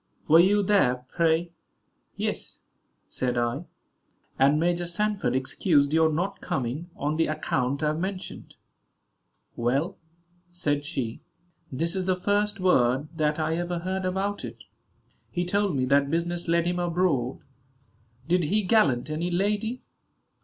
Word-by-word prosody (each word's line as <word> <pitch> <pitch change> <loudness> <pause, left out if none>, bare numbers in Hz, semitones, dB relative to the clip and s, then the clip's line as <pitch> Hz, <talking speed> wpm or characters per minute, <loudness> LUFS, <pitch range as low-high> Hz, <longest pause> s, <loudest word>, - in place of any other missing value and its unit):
Were 160 +2 +7
you 200 +4 +4
there, 125 -12 +2
pray?" 170 0 +1 0.6
"Yes," - - -3 0.5
said 125 -1 -2
I; 120 +7 -1 0.7
"and 140 +3 +4
Major 175 +1 0
Sanford 205 -1 0
excused 140 +2 +2
your 160 0 +4
not 190 +6 -2
coming, 135 +7 -3
on 150 +2 -2
the 165 - +2
account 140 -3 -1
I 150 - +3
have 155 +1 -2
mentioned." 190 +1 -5 1.0
"Well," 135 +10 -1 0.5
said 145 -5 -1
she, 130 -8 -4 0.5
"this 165 +7 -1
is 190 -1 -2
the 185 - +3
first 205 +2 0
word 135 -5 +2
that 150 -1 +1
I 160 0 0
ever 175 0 -2
heard 185 +2 -3
about 190 +2 -2
it; - - -8 0.7
he 175 -1 -2
told 200 -1 +1
me 130 -1 +1
that 140 +1 +3
business 170 +2 -1
led 170 0 +2
him 175 0 0
abroad. 170 -8 0 0.9
Did 175 0 +2
he 210 +7 +1
gallant 155 - +2
any 165 +3 -1
lady?" 210 +6 -1
170 Hz, 140 wpm, -26 LUFS, 145-185 Hz, 1.0 s, Were